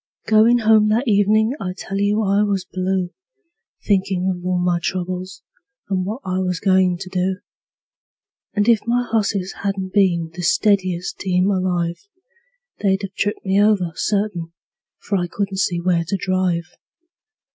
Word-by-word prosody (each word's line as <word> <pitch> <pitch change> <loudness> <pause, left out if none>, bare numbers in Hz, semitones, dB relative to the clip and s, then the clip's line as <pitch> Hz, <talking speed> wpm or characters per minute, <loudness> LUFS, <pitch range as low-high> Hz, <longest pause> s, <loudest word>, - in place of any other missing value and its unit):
Goin' 220 +2 +5
home 215 -2 +4
that 235 +5 +1
evenin' 215 +2 +3
I 180 -1 -3
tell 195 0 -4
you 205 +2 +1
I 200 0 +2
was 200 -3 0
blue, 185 -1 -2 0.7
Thinkin' 190 -2 +1
of 175 - -11
all 180 0 0
my 175 -1 +1
troubles, 185 +1 -4 0.5
and 185 -2 0
what 220 +6 -4
I 185 0 -1
was 180 -2 -1
goin' 185 -2 +3
to 190 +1 -8
do; 185 0 0 1.2
And 205 0 +1
if 230 -2 +5
my 245 +1 +1
hosses 200 -4 -1
hadn't 195 -2 -3
been 175 -5 +2
the 180 - -6
steadiest 185 -1 +1
team 185 +1 +1
alive, 180 -1 -1 0.7
They'd 195 0 +1
've 195 0 -5
tipped 205 +1 -2
me 195 +1 +3
over, 205 -5 +2
certain, 190 -4 -2 0.4
for 200 -2 -2
I 175 - -1
couldn't 195 +1 -3
see 175 -3 0
where 170 -1 +1
to 195 - -1
drive. 185 -3 0
190 Hz, 155 wpm, -20 LUFS, 180-205 Hz, 1.2 s, Goin